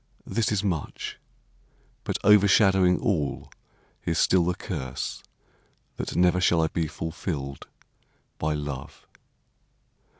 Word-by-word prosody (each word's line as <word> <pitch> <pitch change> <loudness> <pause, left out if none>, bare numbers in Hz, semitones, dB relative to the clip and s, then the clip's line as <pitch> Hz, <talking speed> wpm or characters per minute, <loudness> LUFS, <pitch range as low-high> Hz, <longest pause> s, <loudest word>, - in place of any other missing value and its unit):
This 110 -3 0
is 105 -1 0
much; 85 -7 -3 0.9
But - - -1
overshadowing 95 -2 +5
all 85 - -1 0.5
is 85 -1 -1
still 90 -2 +4
the 90 0 0
curse, 65 -5 -5 0.8
That - - -4
never 90 +1 +3
shall 85 -2 +3
I 80 - +1
be 80 -1 -1
fulfilled 75 -4 -5 0.7
by 75 0 0
love! 70 -3 -6
85 Hz, 105 wpm, -26 LUFS, 75-95 Hz, 0.9 s, overshadowing